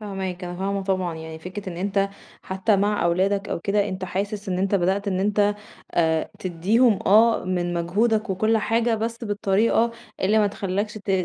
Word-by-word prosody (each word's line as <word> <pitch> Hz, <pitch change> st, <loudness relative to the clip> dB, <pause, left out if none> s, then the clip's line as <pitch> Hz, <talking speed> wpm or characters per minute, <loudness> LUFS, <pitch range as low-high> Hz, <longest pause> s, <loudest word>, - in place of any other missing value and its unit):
فاهماك، 190 Hz, -3 st, -5 dB
أنا 175 Hz, 0 st, -6 dB
فاهمة 195 Hz, +1 st, -2 dB
طبعًا 185 Hz, -3 st, -1 dB
يعني 160 Hz, 0 st, -8 dB
فكرة 185 Hz, +4 st, -7 dB
إن -, -, -9 dB
أنت 195 Hz, +2 st, 0 dB, 0.3 s
حتى 190 Hz, +3 st, +1 dB
مع 205 Hz, 0 st, +1 dB
أولادك 195 Hz, +4 st, +1 dB
أو -, -, -3 dB
كده 205 Hz, +3 st, +1 dB
أنت 185 Hz, -1 st, -4 dB
حاسس 200 Hz, +3 st, -3 dB
إن 180 Hz, -1 st, -1 dB
أنت 195 Hz, +2 st, +1 dB
بدأت 195 Hz, +2 st, +1 dB
إن 185 Hz, -1 st, 0 dB
أنت 205 Hz, +1 st, +2 dB, 0.4 s
آآ، 160 Hz, -2 st, +1 dB
تدّيهم 200 Hz, +6 st, +2 dB
آه 225 Hz, +3 st, +5 dB
من 175 Hz, -1 st, -1 dB
مجهودك 215 Hz, +6 st, +1 dB
وكُلّ 215 Hz, +4 st, +2 dB
حاجة، 230 Hz, +2 st, +1 dB
بس 230 Hz, +2 st, -3 dB
بالطريقة 210 Hz, +2 st, +2 dB, 0.3 s
اللي 210 Hz, +3 st, +3 dB
ما 210 Hz, -, +4 dB
تخلّكش 200 Hz, +1 st, -2 dB
ت 200 Hz, -, -5 dB
195 Hz, 175 wpm, -24 LUFS, 185-210 Hz, 0.4 s, آه